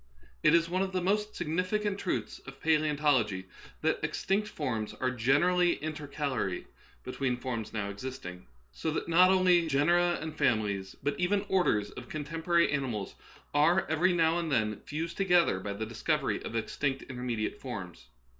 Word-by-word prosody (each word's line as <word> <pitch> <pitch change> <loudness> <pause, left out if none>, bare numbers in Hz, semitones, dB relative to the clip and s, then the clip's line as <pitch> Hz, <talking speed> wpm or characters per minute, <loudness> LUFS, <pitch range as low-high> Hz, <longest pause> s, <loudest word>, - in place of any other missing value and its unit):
It - - +5
is 170 0 +3
one 185 +2 0
of 190 -1 -2
the 185 - +1
most 210 +3 0
signifi 180 +6 -1
cant 205 -1 -1
truths 185 - -3
of 135 0 -10
palasontology 150 -11 +2 0.4
that - - +2
extinct 205 +2 0
forms 115 - -3
are 130 0 -1
generally 170 +9 +3
intercalary 145 - -3 0.4
between 130 -1 -2
forms 120 -4 -4
now 105 -3 -2
existing; 100 - -7 0.2
so 160 - -3
that 155 - -2
not 180 +2 +6
only 180 -3 +4
genera 175 +5 +3
and 160 -1 -6
families, 105 -9 0
but 145 +1 -1
even 195 +3 +1
orders, 110 - +2
of 125 - -10
contemporary 165 +3 +1
animals 130 -8 -2 0.4
are 165 +6 +4
every 175 +4 +3
now 165 -1 +3
and 165 -2 -3
then 110 -5 +1
fused 165 +3 -4
together 175 - +3
by 100 +1 -4
the 110 +2 -4
discovery 135 +6 -1
of - - -6
ex 115 - -3
tinct 140 -2 0
intermediate 125 -4 -3
forms. 90 - -7
150 Hz, 160 wpm, -30 LUFS, 115-175 Hz, 0.4 s, not